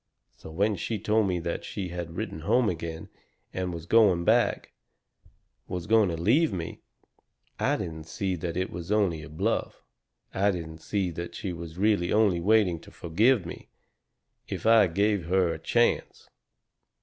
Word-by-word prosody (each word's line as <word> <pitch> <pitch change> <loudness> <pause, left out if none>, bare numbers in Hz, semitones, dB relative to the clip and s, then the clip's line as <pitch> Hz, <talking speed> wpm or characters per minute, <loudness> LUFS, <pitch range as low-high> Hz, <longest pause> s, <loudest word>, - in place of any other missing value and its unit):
So - - -12
when 100 +5 0
she 110 +6 -3
told 105 +1 +1
me 90 -2 0
that 85 0 -3
she 95 -3 -5
had 85 -1 -6
written 110 -6 -4
home 115 +9 +2
again, 80 -2 -5 0.4
and 90 -1 -2
was 85 -1 -7
going 95 -5 +4
back - - +2 0.9
was 90 -2 -4
going 110 -2 +4
to 85 - -3
leave 125 - +3
me, 85 -4 -5 0.8
I - - +1
didn't 80 -2 -6
see 95 +2 -2
that 85 +1 -4
it 95 0 -2
was 85 +2 -6
only 95 -7 +1
a - - -10
bluff. 75 - -2 0.5
I 100 +2 +2
didn't 80 -4 -4
see 95 -2 -1
that 85 +1 -6
she 95 - -4
was 85 -1 -8
really 100 -3 +2
only 105 -5 +3
waiting 100 -3 +3
to - - -15
forgive 100 +5 +2
me, - - -9 0.8
if - - -5
I 110 -3 +6
gave 100 +1 +1
her 90 -2 +2
a 80 - -7
chance. 120 +8 0
90 Hz, 165 wpm, -27 LUFS, 85-105 Hz, 0.9 s, I